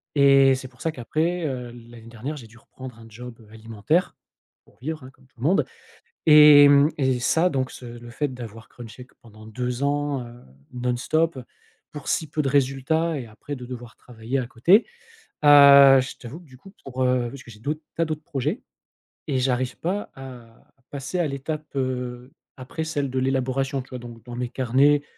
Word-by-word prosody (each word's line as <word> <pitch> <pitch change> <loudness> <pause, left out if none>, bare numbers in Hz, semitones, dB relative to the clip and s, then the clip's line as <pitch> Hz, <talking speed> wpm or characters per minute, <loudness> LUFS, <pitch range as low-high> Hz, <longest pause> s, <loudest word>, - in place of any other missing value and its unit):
et 135 -1 +5
c'est 130 0 -7
pour 130 -1 -20
ça 160 - -1
qu'après, 160 +6 -2
heu, 130 -4 -4
l'année 120 -1 -14
dernière, 120 +6 -6
j'ai 120 -5 -11
dû 115 +2 -19
reprendre 130 -1 -12
un 115 - -14
job, 120 +1 -10
heu, 110 - -18
alimentaire 115 - -1 0.5
pour - - -27
vivre, 155 +3 -5
hein, 130 - -12
comme 130 0 -26
tout 130 - -30
le - - -8
monde 175 +7 +2 0.6
et 150 -2 +9
mmh 140 +1 +5
et 130 -3 +1
ça, 165 +8 +2
donc 130 -4 -2
ce 125 - -11
le 120 0 -10
fait 145 +4 -2
d'avoir 115 -3 -10
crunché 120 +1 -11
q - - -29
pendant 110 -1 -16
2 125 +3 -4
ans, 145 -2 -1
heu, 120 +1 -15 0.3
non-stop 130 +5 -1 0.5
pour 150 -2 -9
si 160 - 0
peu 155 - -1
de 140 - -1
résultats 140 +4 0
et 125 - -7
après 110 +6 -8
de 125 -2 -9
devoir 120 -1 -9
travailler 120 +2 -5
à 125 - -4
côté. 170 - +4 0.6
Heu, 140 -2 +8
je 130 - -7
t'avoue 125 +7 -10
que 175 - -18
du 130 -3 -17
coup, 195 +9 -16
pour, 130 -1 -3
heu 125 -1 +1
parce 135 +2 -10
que - - -15
j'ai 105 - -15
d'autres 150 +6 -4
tas 165 - +1
d'autres 155 -1 -5
projets, 150 - -3 0.6
et 135 -4 0
j'arrive 125 -1 -1
pas 195 +5 -3
à 125 -4 -13 0.2
passer 140 +5 -5
à 175 - +1
l'étape, 150 +3 -5
heu, 125 -1 -4 0.3
après 130 +5 -6
celle 145 -3 -2
de 130 - -1
l'élaboration, 135 +1 -1
tu 125 - -16
vois? 125 - -7
Donc 115 -2 -11
dans 120 -1 -8
mes 125 0 -3
carnets, 135 +4 +2
130 Hz, 200 wpm, -23 LUFS, 120-145 Hz, 0.6 s, et